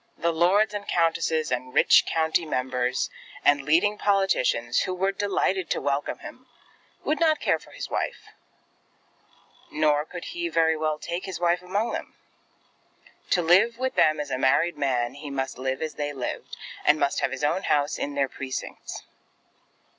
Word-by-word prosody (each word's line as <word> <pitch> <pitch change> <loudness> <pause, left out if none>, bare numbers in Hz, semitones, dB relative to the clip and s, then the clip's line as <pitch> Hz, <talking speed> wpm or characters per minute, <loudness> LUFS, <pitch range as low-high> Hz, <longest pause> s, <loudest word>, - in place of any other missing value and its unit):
The 170 - +1
lords 185 +6 +3
and 205 -1 -5
countesses, 165 -2 +1
and 130 +1 -3
rich - - +6
county 160 +1 +1
members, 125 -4 -1 0.3
and 145 0 +5
leading 175 +9 +2
politicians, 190 - +2
who 185 - -1
were 190 +2 +1
delighted 195 -2 -1
to - - 0
welcome 140 +1 -1
him, 305 -6 -12 0.6
would 310 - 0
not 315 -2 +3
care - - +1
for - - -17
his - - -7
wife; - - -4 1.4
nor 150 -1 +2
could 175 +1 -8
he 345 0 -2
very 160 - +3
well 155 -1 -1
take 170 +3 -5
his 190 -2 -5
wife 175 +1 +2
among 200 +6 -1
them. - - -6 1.1
To 175 - +2
live 190 +8 +4
with 260 +1 -1
them 155 -1 +3
as 145 -1 -4
a 130 - -1
married 155 +6 +3
man, 125 -4 0
he 145 +1 -8
must 135 -2 -3
live 130 +2 -2
as 155 - -4
they 145 0 -3
lived; 130 -3 -5 0.3
and 150 +1 +4
must 140 - +1
have - - +1
his 135 +1 -6
own 150 +6 +1
house 145 -5 +1
in 145 - -3
their 140 -1 +2
precincts. 130 0 -6
160 Hz, 170 wpm, -25 LUFS, 140-190 Hz, 1.4 s, rich